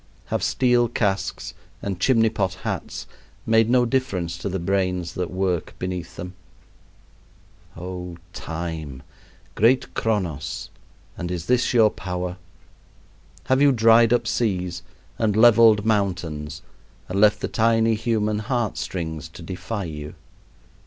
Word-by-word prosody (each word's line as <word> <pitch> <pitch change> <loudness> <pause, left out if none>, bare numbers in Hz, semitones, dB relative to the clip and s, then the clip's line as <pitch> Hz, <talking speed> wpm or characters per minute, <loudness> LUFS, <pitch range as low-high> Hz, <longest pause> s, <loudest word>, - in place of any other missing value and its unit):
Have - - +1
steel 125 -2 +3
casques 100 -4 -2 0.3
and 95 -3 -4
chimney 115 +1 +4
pot 95 -3 -1
hats - - -4 0.4
made 115 0 +4
no 125 0 +4
difference 115 -10 -1
to 100 - -3
the 95 - -2
brains 90 -1 -1
that 90 -1 -3
work 90 -2 -2
beneath 90 -2 -5
them? 90 +1 -7 1.4
Oh, 90 0 -6 0.2
Time! 80 -6 -5 0.5
great 120 +5 +3
Chronos! 90 -10 -2 0.5
and 85 - -4
is 90 -2 -4
this 125 0 +2
your 110 -4 +5
power? 90 0 -4 1.1
Have 130 +1 +2
you 145 -1 +6
dried 115 -1 +5
up 120 -1 +3
seas 95 -7 -1 0.4
and 110 -3 +1
leveled 110 -2 +6
mountains 85 -8 -1 0.4
and 95 +2 -1
left 105 0 +5
the - - -2
tiny 115 0 +2
human 110 -1 0
heart 115 -1 -1
strings 80 -4 -4
to 85 - -11
defy 95 +4 -4
you? 75 -3 -7
100 Hz, 125 wpm, -23 LUFS, 90-115 Hz, 1.4 s, you